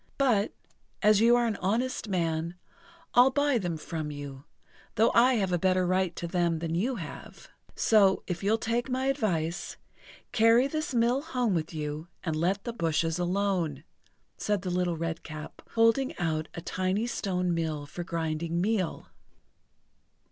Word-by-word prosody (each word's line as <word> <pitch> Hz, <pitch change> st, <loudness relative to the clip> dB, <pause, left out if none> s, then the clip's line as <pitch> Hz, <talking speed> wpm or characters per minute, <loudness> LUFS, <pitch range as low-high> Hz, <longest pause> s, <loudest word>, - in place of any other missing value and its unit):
"But, 235 Hz, -7 st, +2 dB, 0.5 s
as 210 Hz, 0 st, +5 dB
you 235 Hz, +1 st, +6 dB
are 240 Hz, 0 st, +3 dB
an 220 Hz, -3 st, -1 dB
honest 230 Hz, +5 st, -1 dB
man, 170 Hz, -2 st, -1 dB, 0.6 s
I'll 245 Hz, +2 st, +7 dB
buy 285 Hz, -2 st, +2 dB
them 175 Hz, -5 st, -2 dB
from 155 Hz, -1 st, -5 dB
you, 145 Hz, -2 st, -8 dB, 0.5 s
though 225 Hz, +2 st, +4 dB
I 250 Hz, +2 st, +5 dB
have 195 Hz, -5 st, 0 dB
a 175 Hz, -, +2 dB
better 185 Hz, +1 st, +2 dB
right 185 Hz, 0 st, +1 dB
to -, -, -5 dB
them 170 Hz, -1 st, +1 dB
than 165 Hz, 0 st, -3 dB
you 230 Hz, +10 st, 0 dB
have. 165 Hz, -9 st, -9 dB, 0.3 s
So, 200 Hz, -4 st, +4 dB
if 175 Hz, -2 st, -4 dB
you'll 215 Hz, +3 st, +3 dB
take 235 Hz, +3 st, -1 dB
my 260 Hz, +1 st, -1 dB
advice, 175 Hz, -, -1 dB, 0.5 s
carry 230 Hz, +3 st, +5 dB
this 310 Hz, -1 st, -3 dB
mill 240 Hz, +3 st, +3 dB
home 250 Hz, -9 st, -1 dB
with 165 Hz, -2 st, -1 dB
you, 155 Hz, 0 st, -4 dB, 0.2 s
and 160 Hz, -3 st, -1 dB
let 185 Hz, +5 st, 0 dB
the 235 Hz, -, -4 dB
bushes 165 Hz, -3 st, 0 dB
alone," 175 Hz, -5 st, 0 dB, 0.5 s
said 205 Hz, -3 st, -1 dB
the 180 Hz, -, -2 dB
Little 175 Hz, -1 st, 0 dB
Redcap, 160 Hz, -2 st, -6 dB
holding 230 Hz, +4 st, +3 dB
out 160 Hz, -2 st, -1 dB
a 170 Hz, -, -5 dB
tiny 185 Hz, +5 st, -1 dB
stone 180 Hz, -6 st, -1 dB
mill 160 Hz, -3 st, -2 dB
for 175 Hz, +4 st, -6 dB
grinding 165 Hz, 0 st, -2 dB
meal. 195 Hz, -2 st, -1 dB
185 Hz, 155 wpm, -28 LUFS, 165-230 Hz, 0.6 s, I'll